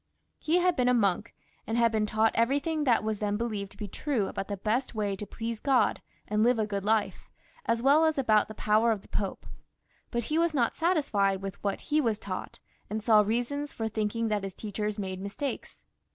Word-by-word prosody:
He 320 +3 +2
had 360 -1 +3
been 250 -1 +2
a 250 - +4
monk, 200 -6 +1 0.3
and 225 +2 -1
had 235 -1 +4
been 215 -1 +1
taught 220 +1 +2
everything 285 +6 +1
that 235 -4 +3
was 215 -1 -2
then 205 -1 0
believed 210 -4 -3
to - - -20
be 210 -1 -5
true 245 +1 -1
about 195 - -4
the 205 - -4
best 230 +6 -1
way 205 -2 -1
to 205 +1 -7
please 230 -1 -5
God 270 0 +2 0.3
and 210 0 +1
live 240 +2 +4
a 220 - +1
good 200 -2 -3
life, 215 0 0 0.4
as 230 +1 +1
weU 305 +4 +5
as 315 - -4
about 215 -6 +3
the 215 - -9
power 215 +3 +3
of 210 -3 -2
the - - -17
Pope; 195 -2 -3 0.6
but 235 0 -2
he 305 +7 0
was 335 -2 +1
not 235 -4 +2
satisfied 210 - +1
with 195 0 -6
what 200 -1 -1
he 305 +1 +1
was 225 -6 0
taught, 195 -3 -6 0.3
and 215 +1 -3
saw 215 -2 +6
reasons 245 +7 -1
for 225 - -3
thinking 220 +1 -1
that 210 -1 0
his 195 -1 -5
teachers 210 0 -3
made 190 -2 -4
mistakes. 200 +8 -5
220 Hz, 215 wpm, -29 LUFS, 205-250 Hz, 0.6 s, saw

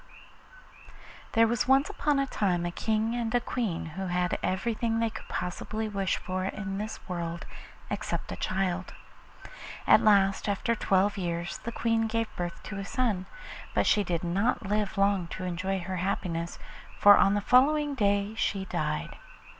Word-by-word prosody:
There 230 0 +6
was 235 +1 0
once 270 +2 +5
upon 295 -2 0
a 275 - +2
time 180 -9 0
a 175 - -2
King 220 +4 0
and 235 -2 -2
Queen 220 -10 -2
who 185 +4 -5
had 180 0 0
everything 225 +4 -1
they 230 -1 +1
could 220 - -9
possibly 215 +5 -3
wish 195 -2 -1
for 185 0 -3
in 195 0 -4
this 215 +1 -5
world 170 -2 -4 0.5
except - - -3
a - - -3
child. 185 -1 -2 0.9
At - - +7
last, 200 -1 +3
after 205 +3 0
twelve 200 -2 +1
years, 170 -1 -3
the 235 - -5
Queen 225 -1 +1
gave 225 0 -2
birth 175 -1 -5
to 205 -2 -6
a - - -3
son; 200 -4 -1 0.5
but - - +3
she 205 - +4
did 175 -2 -2
not 200 +7 0
live 210 0 -1
long 195 -3 +2
to 185 - -5
enjoy 185 +2 -2
her 185 +1 -4
happiness, 170 -2 -2 0.4
for 205 0 +8
on 195 - +4
the - - +2
following 285 +7 +4
day 200 -3 +1
she 195 -3 -1
died. - - -3
200 Hz, 160 wpm, -28 LUFS, 185-225 Hz, 0.9 s, for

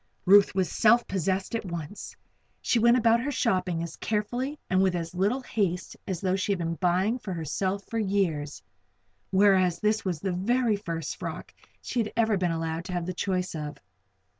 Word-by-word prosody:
Ruth 200 +1 +6
was 190 -2 +2
self 235 +2 +4
posessed 190 +2 -1
at 230 - -1
once. 170 0 -7 0.5
She 235 - +2
went 235 +2 +5
about 230 -1 +4
her 275 - -2
shopping 185 -10 0
as 170 - -7
carefully 245 +7 -2
and 185 +1 +2
with 190 -2 +2
as 165 -1 -4
little 205 +9 +1
haste 190 -8 -2
as 185 -4 -3
though 190 -1 +1
she 195 +1 -1
had - - -2
been 165 -1 -2
buying 185 +7 +1
for 195 -5 -5
herself 185 +5 -2
for 230 - -3
years; 185 -8 -1 0.7
whereas 190 -3 +4
this 215 0 +1
was 180 -5 -2
the 190 +2 -2
very 230 +5 +1
first 165 -6 -4
frock - - -6
that - - -26 0.2
she 250 - -2
had 215 -2 -1
ever 220 -2 +3
been 180 -2 0
allowed 165 0 -3
to 185 - -6
have 175 -1 -2
the 185 - -3
choice 185 0 -2
of. 150 -2 -5
190 Hz, 190 wpm, -27 LUFS, 175-215 Hz, 0.7 s, Ruth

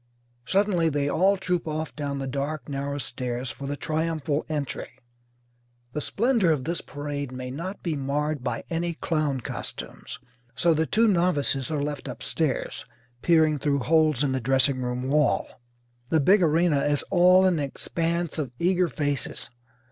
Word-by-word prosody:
Suddenly 190 - +2
they 145 -1 0
all 190 +7 +3
troop 180 -3 -1
off 155 0 -3
down 145 -2 -3
the 135 - -3
dark 140 +1 -3
narrow 140 0 -3
stairs 125 -2 -3
for 140 - -7
the 145 +1 -3
triumphal 155 -1 -1
entry. 145 -4 -4 1.0
The 150 - -2
splendour 225 - +2
of 150 -5 +1
this 170 +3 -2
parade 145 -2 -5
may 125 0 -6
not 175 +9 -6
be 165 -4 -1
marred 145 0 -1
by 125 - -2
any 170 0 -1
clown 155 -5 -1
costumes, - - -7 0.4
so 170 -1 +3
the 160 0 +1
two 225 +1 +3
novices 170 - +2
are 150 -3 -1
left 145 -1 -4
upstairs, 130 +3 -2 0.4
peering 160 -3 +4
through 140 -1 +1
holes 155 -1 +3
in 140 - +1
the 130 -1 -1
dressing 135 +1 +3
room 125 +1 -2
wall. 145 -1 +2 0.6
The 160 - +3
big 190 +8 +5
arena 165 -2 +3
is 145 0 +1
all 185 0 +6
an 180 -4 +3
expanse 165 +4 -2
of 140 -4 -2
eager 180 +2 +2
faces. 145 -6 -3
150 Hz, 155 wpm, -26 LUFS, 140-170 Hz, 1.0 s, all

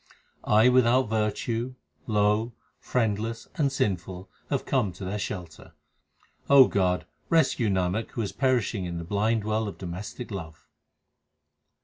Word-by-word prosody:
I 110 +3 +5
without 125 -1 +4
virtue, 115 +3 -1 0.3
low, 105 +2 +1 0.3
friendless, 115 -1 -1
and 140 -3 +1
sinful 95 -5 -2 0.2
have 140 - -1
come 125 -8 +1
to 95 +2 -8
their 100 +3 -3
shelter. 90 -6 -6 0.8
God, 100 -10 +5 0.2
rescue 135 -8 +3
Nanak 95 +3 0
who 115 - -2
is 100 - -3
perishing 120 -7 0
in 85 -1 -4
the 85 - -5
blind 105 +5 0
well 110 +1 -1
of 100 - -7
domestic 95 +7 -7
love. 80 -5 -8
105 Hz, 125 wpm, -27 LUFS, 95-120 Hz, 0.8 s, I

